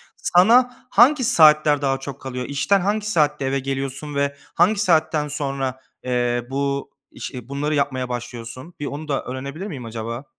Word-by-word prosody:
sana 245 - +3
hangi 255 +5 +5
saatler 155 - +5
daha 135 -1 0
çok 140 0 -8
kalıyor? 125 -1 -5
İşten 145 +9 +1
hangi 210 +2 -1
saatte 150 -5 +1
eve 135 +1 0
geliyorsun 135 +2 -4
ve 140 0 0 0.2
hangi 200 +5 +3
saatten 160 -5 +2
sonra, 135 -3 -3 0.2
eee, 120 -1 -1
bu 140 0 -2 0.2
iş - - -7
iii, 125 -1 -9
bunları 145 +2 -1
yapmaya 130 -3 -1
başlıyorsun? 120 +5 -7
Bir 145 - -4
onu 145 +2 -6
da 140 -2 -1
öğrenebilir 140 +8 -6
miyim 135 - -7
acaba? 115 +3 -6
140 Hz, 160 wpm, -22 LUFS, 130-160 Hz, 0.2 s, hangi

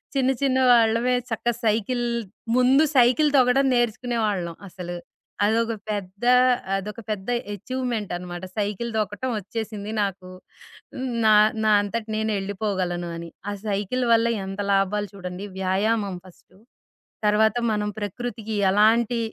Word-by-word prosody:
చిన్న 265 0 +3
చిన్న 260 -1 +2
వాళ్ళమే 230 +2 +3 0.2
చక్క 225 +1 -4 0.2
సైకిల్ 230 +3 +1 0.5
ముందు 260 +4 +5
సైకిల్ 255 +5 +5
తొక్కడం 255 +2 +4
నేర్చుకునేవాళ్ళం, 220 -7 -1
అసలు. 175 -1 -6 0.5
అదొక 230 +2 +1 0.2
పెద్దా 205 +4 0 0.4
అదొక 210 +3 -5
పెద్ద 205 +1 -3 0.2
ఎచీవ్‌మెంటనమాట. 205 -8 -4
సైకిల్ 210 +3 -2
తొక్కటవొచ్చేసింది 215 -1 -3
నాకు. 190 -2 -3 1.0
నా 215 - +6 0.3
నా 215 - +3
అంతట 215 +2 -3
నేనెళ్ళిపోగలను 195 -4 -2
అని. 170 0 -7 0.2
ఆ - - -2
సైకిల్ 210 +5 -1
వల్ల 230 0 +5 0.2
ఎంత 195 +1 -4
లాభాలు 200 +1 +1
చూడండి, 180 0 -7
వ్యాయామం 195 +1 0
ఫస్టు, 185 +1 -19 0.7
తర్వాత 215 +1 +3 0.2
మనం 210 0 -1
ప్రకృతికి 220 +1 -5 0.2
ఎలాంటి 225 +3 +3
210 Hz, 110 wpm, -24 LUFS, 195-235 Hz, 1.0 s, నా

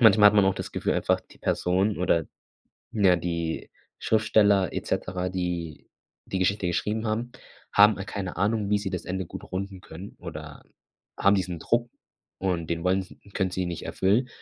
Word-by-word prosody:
manchmal 110 -2 +8
hat 105 - 0
man 105 - +6
auch 95 0 +3
das - - -6
Gefühl - - 0
einfach, - - +1
die - - -20
Person 95 +4 +1
oder 85 -3 +2 0.7
ja, 95 -5 +4
die 85 -1 -3 0.3
Schriftsteller 105 -4 +3
et - - -4
cetera, 90 0 -1
die 90 -4 -4 0.4
die 95 - -2
Geschichte 95 +1 +1
geschrieben 105 +6 -1
haben, 115 +3 -2 0.4
haben 105 +1 +7
keine 100 -5 -4
Ahnung, 105 0 +1
wie 105 - +4
sie 100 -2 -4
das 90 - -4
Ende 95 0 -3
gut - - -8
runden 95 0 -4
können 100 -1 -10
oder 80 -4 -8 0.5
haben 100 - +5
diesen 90 -3 -1
Druck 120 +7 0 0.5
und 90 -4 -1
den 85 -1 -2
wollen 95 +1 +3
s 95 - -10 0.2
können 95 -2 +1
sie 95 0 -2
ihn 90 - -2
nicht 85 - -5
erfüllen 110 +7 +2
95 Hz, 180 wpm, -26 LUFS, 90-105 Hz, 0.7 s, manchmal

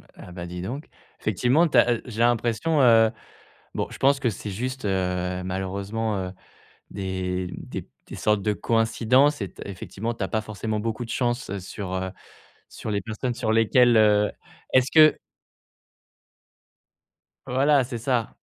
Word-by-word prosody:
Ah - - -12
bah, 90 -1 -7
dis 90 0 -6
donc, 130 - -5 0.3
effectivement 125 - +2
tu 145 - +1
as 120 +1 +6
heu, 110 - -7
j'ai 115 -3 -4
l'impression 120 +6 +2
heu, 115 -3 +6 0.6
bon - - -1
je - - -8
pense 140 +1 +4
que 125 - +1
c'est 105 - -7
juste, 125 +5 -4
heu, 90 -1 -1
malheureusement, 100 +4 -3
heu, 95 -1 -3 0.6
des 95 -1 -3
des - - -7 0.2
des - - -8
sortes 105 -1 +1
de 105 - +1
coïncidences. 115 +6 +2
Et 100 - -3
t - - -11
effectivement, 100 +4 -5
tu 115 - -7
as 95 - -1
pas 110 - 0
forcément 110 0 -4
beaucoup 115 +2 -3
de - - -10
chance 120 -3 -1
sur, 95 0 -6
heu, 95 0 -2 0.6
sur - - -7
les 100 -1 0
personnes 110 +5 -3
sur 115 -2 -1
lesquelles 120 +2 +4
heu, 105 -1 +4 0.4
est-ce 130 +1 +4
que 155 -1 +6 2.3
voilà 135 +2 +3
c'est 120 -1 -5
ça. 120 -1 -1
110 Hz, 160 wpm, -25 LUFS, 95-125 Hz, 2.3 s, as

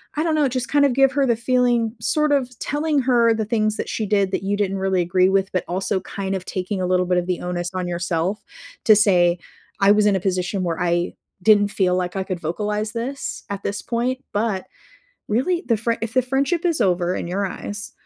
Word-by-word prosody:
I 305 - 0
don't 320 -2 +1
know, 290 -3 +2
just 255 0 -2
kind 290 0 +3
of 275 - +3
give 270 0 +4
her 280 -1 +2
the 235 -3 +1
feeling 240 -2 +1
sort 300 -1 +1
of 255 -3 -1
telling 295 0 0
her 240 -3 +3
the 220 -1 -2
things 215 -1 0
that - - -3
she 220 - -2
did 200 -1 +1
that 195 - -2
you 200 +1 -1
didn't 195 -1 -1
really 190 -1 0
agree 185 +2 +2
with 195 0 +1
but 185 - 0
also 190 +1 -1
kind 195 +1 -4
of 185 - -4
taking 185 +1 -3
a - - 0
little 180 0 +2
bit 180 0 +1
of 175 - -1
the 180 -1 -1
onus 175 0 -3
on 180 -1 -3
yourself 175 +3 -2 0.4
to 220 - +8
say, 180 -5 +4 0.4
"I 195 0 +5
was 210 0 +4
in 205 - +4
a - - -2
position 185 +1 -1
where 170 -1 -2
I 175 0 0 0.3
didn't 205 -1 +5
feel 185 -2 +1
like 180 0 -2
I 190 - -1
could 185 -2 -4
vocalize 210 +6 -2
this 255 +4 -4
at 200 -1 -5
this 200 0 -2
point," 250 +3 -2
but, 205 -3 -1 0.6
really, 335 - 0
the 230 - +2
frie 230 +2 -1
if 225 -1 -4
the 255 - +4
friendship 275 +7 0
is 335 -3 +1
over 180 -1 +1
in - - -4
your 195 +3 -1
eyes, 205 +3 -6
205 Hz, 230 wpm, -22 LUFS, 185-245 Hz, 0.6 s, to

